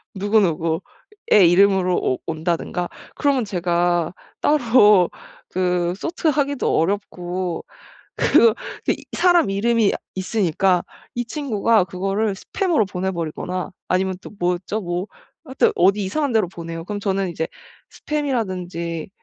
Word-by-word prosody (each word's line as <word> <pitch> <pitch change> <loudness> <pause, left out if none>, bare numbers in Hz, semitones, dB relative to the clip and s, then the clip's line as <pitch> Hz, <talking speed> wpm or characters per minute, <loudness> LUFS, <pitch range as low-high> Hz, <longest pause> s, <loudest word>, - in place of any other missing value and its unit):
누구 205 +3 +2
누구의 170 - +1
이름으로 190 -1 +4
오 130 - 0
온다든가 170 +2 -2 0.3
그러면 275 -5 +1
제가 175 -3 0 0.3
따로 225 - +5 0.4
그 180 -1 0
sort 330 - -1
하기도 285 -2 0
어렵고 180 -1 -2 0.5
그 230 -2 +5 0.3
이 - - 0
사람 350 - +4
이름이 220 +2 +2 0.2
있으니까 190 -2 +1 0.3
이 240 0 -2
친구가 230 - +1
그거를 195 +3 -1
스팸으로 330 - 0
보내 190 0 -2
버리거나 180 +2 -4 0.2
아니면 190 +1 +1
또 - - -10
뭐였죠? 180 +4 -1
뭐 175 +2 -3 0.4
하여튼 265 -3 +2
어디 195 +3 +3
이상한 280 +8 -1
데로 215 -5 +3
보내요. 165 -2 -7
그럼 205 0 -4
저는 195 -2 -1
이제 160 -1 -3 0.4
스팸이라든지 185 - -3
190 Hz, 290 characters per minute, -21 LUFS, 175-225 Hz, 0.5 s, 따로